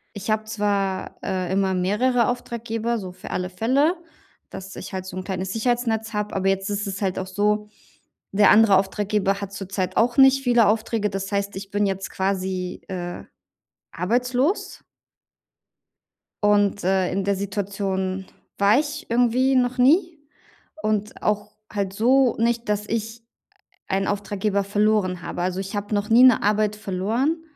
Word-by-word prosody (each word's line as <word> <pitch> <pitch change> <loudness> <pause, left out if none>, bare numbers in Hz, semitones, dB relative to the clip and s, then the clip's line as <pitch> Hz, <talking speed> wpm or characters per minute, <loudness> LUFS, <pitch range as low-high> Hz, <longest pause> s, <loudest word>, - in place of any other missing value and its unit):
Ich 205 +1 -6
habe 215 0 +1
zwar, 205 -3 -2
äh, 185 -1 -2
immer 190 0 +1
mehrere 210 +7 +2
Auftraggeber 235 -1 -2
so 190 -4 -6
für 180 - -10
alle 180 0 -2
Fälle, 260 - +2 0.5
dass 190 0 -9
ich - - -8
halt 185 -1 -4
so 185 - -7
'n 185 - -4
kleines 190 0 -4
Sicherheitsnetz 230 -1 -1
habe, 210 0 -3
aber 195 0 0
jetzt 195 0 -1
ist 205 0 -2
es 195 0 -5
halt 190 -2 -1
auch 190 - -4
so, 210 +2 0 0.7
der 205 0 +5
andere 210 -2 +6
Auftraggeber 200 0 0
hat 200 -1 -6
zurzeit 195 -2 -4
auch 240 +2 +2
nicht 270 0 +6
viele 240 -3 +4
Aufträge. 215 0 0
Das 195 0 -4
heißt, 200 0 -1
ich 195 +1 -7
bin 205 +1 +1
jetzt 195 -1 -3
quasi, 190 -1 -2
äh, 175 -2 -5 0.7
arbeitslos. 250 - -1 1.6
Und, 205 -1 +3
äh, 190 0 +1
in 195 +1 -1
der 200 +1 +1
Situation 195 -1 -3 0.3
war 205 +5 +4
ich 295 -1 -5
irgendwie 245 +3 +3
noch 250 0 +1
nie 315 +6 +3 0.6
und 215 0 -2
auch 210 -1 -1 0.2
halt 200 -2 -2
so 245 +4 +3
nicht, 235 0 0
dass 210 0 -1
ich 225 +1 -3 0.7
einen 195 +1 0
Auftraggeber 200 0 -1
verloren 205 -3 +1
habe. 175 - -4
Also, 185 +1 -1
ich 195 +2 -5
habe 205 +1 -3
noch 205 0 -1
nie 235 +3 +7
'ne 255 -2 +6
Arbeit 210 0 +1
verloren, 220 - -1
205 Hz, 155 wpm, -23 LUFS, 190-230 Hz, 1.6 s, nie